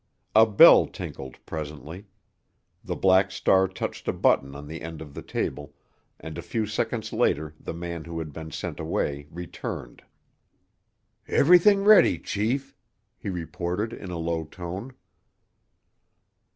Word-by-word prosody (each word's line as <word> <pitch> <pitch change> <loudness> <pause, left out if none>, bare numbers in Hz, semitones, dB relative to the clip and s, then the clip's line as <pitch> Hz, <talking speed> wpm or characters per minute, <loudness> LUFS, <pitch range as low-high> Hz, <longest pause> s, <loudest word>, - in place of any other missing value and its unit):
A 110 +1 +7
bell 105 - +8
tinkled 65 -1 -8
presently; 80 +5 -7 0.8
the - - -4
Black 95 +1 +4
Star 95 0 +3
touched 95 - -6
a - - +1
button 70 +1 +1
on 70 +1 -8
the 80 +2 -7
end 80 -1 -7
of 75 -3 -10
the - - -7
table, 75 -1 -4 0.4
and 80 +1 -7
a - - -4
few 110 +6 -2
seconds 110 +1 -3
later 75 +1 0
the - - -6
man 85 -2 -6
who 85 0 -6
had 80 -3 -5
been 80 +1 -7
sent - - -6
away 70 0 -2
returned. 85 -7 -7 1.3
"Everything 180 +6 +5
ready, 210 0 +6
chief," 125 +7 -2 0.4
he - - -5
reported 90 +5 -3
in 95 - -8
a 90 - -4
low 80 0 -2
tone. 90 +9 -7
85 Hz, 140 wpm, -26 LUFS, 80-105 Hz, 1.3 s, bell